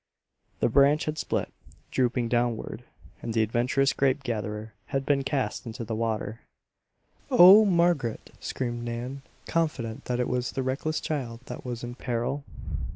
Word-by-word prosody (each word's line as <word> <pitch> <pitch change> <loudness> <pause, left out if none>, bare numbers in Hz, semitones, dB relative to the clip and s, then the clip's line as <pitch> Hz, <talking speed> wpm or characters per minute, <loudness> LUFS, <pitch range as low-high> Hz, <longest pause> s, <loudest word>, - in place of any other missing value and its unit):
The - - +4
branch 140 +5 +4
had 155 0 -3
split, - - -2 0.4
drooping 125 -1 +1
downward, 120 -1 -1 0.4
and 115 -1 -4
the 110 - +4
adventurous 125 +5 +2
grape 135 0 +1
gatherer 105 -2 -4
had 135 0 -2
been 140 -1 +2
cast 135 -2 -2
into 115 +1 -5
the 110 - -4
water. 110 0 -2 0.9
"Oh, 195 +5 +9
Margaret!" 170 - +1
screamed 120 -2 -3
Nan, 120 +3 -4 0.2
confident 140 -7 -1
that 125 0 -1
it 125 - +1
was 125 0 -1
the 135 - -1
reckless 140 +4 -1
child 125 -6 -3
that - - -7
was 120 -2 -5
in 120 0 -5
peril. 125 +3 -2
125 Hz, 150 wpm, -27 LUFS, 115-140 Hz, 0.9 s, Oh